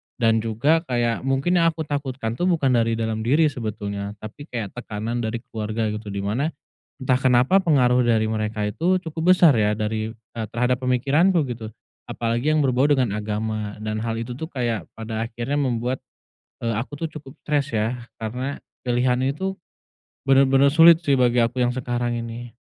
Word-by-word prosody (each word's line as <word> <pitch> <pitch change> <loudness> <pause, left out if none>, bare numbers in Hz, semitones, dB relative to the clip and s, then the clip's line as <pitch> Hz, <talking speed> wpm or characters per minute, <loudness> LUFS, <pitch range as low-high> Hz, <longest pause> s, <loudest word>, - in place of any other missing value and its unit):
Dan 115 -2 +2
juga, 115 +9 +2
kayak 120 0 -1
mungkin 135 +7 +2
yang 165 - +4
aku 160 - -3
takutkan 135 -6 -4
tuh 180 - +1
bukan 155 -7 +2
dari 115 -2 +2
dalam 110 -1 -2
diri 145 +7 +3
sebetulnya, 105 -5 -5
tapi 145 +8 -9
kayak 115 -8 -4
tekanan 115 0 -4
dari 115 +1 -3
keluarga 110 0 -3
gitu. 105 0 -6
Di 100 -1 -4
mana, 135 +10 -1 0.4
entah 130 -1 +1
kenapa 130 +8 +3
pengaruh 125 -6 +3
dari 115 -2 +2
mereka 110 -1 -2
itu 175 - +1
cukup 165 0 -1
besar 165 -7 +6
ya 105 -1 +2
dari, 110 0 -2
eee, 115 0 -8
terhadap 125 +2 0
pemikiranku, 145 +7 +2
gitu. 115 -3 -6 0.4
Apalagi 120 +5 -1
yang 155 - +3
berbau 130 +2 +2
dengan 130 -7 +2
agama, 105 0 -3
dan 110 0 -3
hal 115 0 -2
itu 115 +2 -5
tuh 160 +6 -6
kayak 120 -4 -3
pada 110 0 -4
akhirnya 120 +5 -3
membuat, 125 0 -1 0.6
eee, 115 -1 0
aku 125 +5 -5
tuh - - -8
cukup 145 -3 -10
stres 145 -4 -1
ya, 120 +3 -1 0.2
karena 125 +5 -4 0.2
pilihan 125 +1 +2
itu 190 +8 -2 0.7
bener-bener 135 +1 +5
sulit 165 +3 +7
sih 140 -5 +2
bagi 120 -1 +3
aku 115 +2 0
yang 120 0 +1
sekarang 120 -1 -2
ini. 115 +1 -7
120 Hz, 170 wpm, -23 LUFS, 110-140 Hz, 0.7 s, sulit